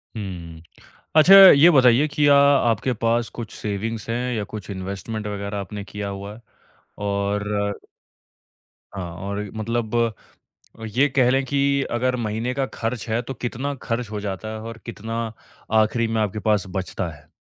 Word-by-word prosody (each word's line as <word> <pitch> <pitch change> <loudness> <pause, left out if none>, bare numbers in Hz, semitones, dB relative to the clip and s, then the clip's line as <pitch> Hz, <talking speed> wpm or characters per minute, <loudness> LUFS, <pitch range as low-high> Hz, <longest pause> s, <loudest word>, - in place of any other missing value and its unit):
हुँ। 85 -6 -7 0.5
अच्छा, 160 +5 +7
ये 175 -5 +9
बताइए 130 0 +5
कि 145 0 +1
या 145 - +7
आपके 130 -4 +3
पास 115 +1 0
कुछ 110 -2 -6
सेविंग्स 110 +2 -4
हैं 125 +2 -1
या 105 - -2
कुछ 105 -3 -7
इन्वेस्टमेंट 100 +3 -5
वग़ैरह 100 0 -4
आपने 100 +1 -6
किया 100 0 -6
हुआ 100 +1 -7
है? 115 - -15 0.6
और 100 0 -2 1.2
हाँ 90 -3 -5 0.2
और 100 +1 -3
मतलब 115 +1 -2 1.0
ये 140 +3 +4
कह 130 -2 +3
लें 135 +1 +2
कि 140 +1 -1 0.3
अगर 125 +2 0
महीने 115 +1 -2
का 135 0 -1
खर्च 115 0 -3
है 115 +2 0
तो 130 +2 -6
कितना 125 +3 -4
खर्च 115 -2 -3
हो 105 - -3
जाता 100 +1 -5
है? 110 - -6
और 115 +1 -8
कितना 115 0 -4 0.5
आखिरी 115 +2 0
में 110 -1 0
आपके 105 0 -2
पास 105 -3 +3
बचता 95 0 -3
है? 75 -1 -14
110 Hz, 160 wpm, -23 LUFS, 100-125 Hz, 1.2 s, ये